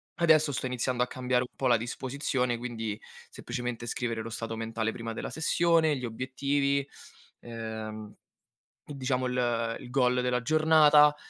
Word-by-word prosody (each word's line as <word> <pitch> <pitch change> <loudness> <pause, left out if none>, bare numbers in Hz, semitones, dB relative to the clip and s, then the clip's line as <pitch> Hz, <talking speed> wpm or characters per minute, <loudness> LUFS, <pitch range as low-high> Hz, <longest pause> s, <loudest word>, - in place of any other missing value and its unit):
adesso 155 -3 +4
sto 130 - -3
iniziando 125 0 -1
a - - -2
cambiare 125 0 0
un - - -43
po' 135 - -4
la 120 -2 +5
disposizione, 125 +1 -2
quindi: 115 -3 -4 0.3
semplicemente 120 -1 -5
scrivere 115 -1 -2
lo 115 - -6
stato 115 0 -4
mentale 115 0 -2
prima 115 0 -5
della - - -5
sessione, 160 -1 +2
gli 125 - -4
obiettivi, 140 +4 -1 0.5
ehm, 110 -2 -7 0.7
diciamo 130 -3 -2
il 125 0 -2
ehm, 115 -2 0
il - - -10
goal 125 -1 +2
della 125 0 0
giornata, 155 -1 +6
125 Hz, 150 wpm, -29 LUFS, 115-140 Hz, 0.7 s, giornata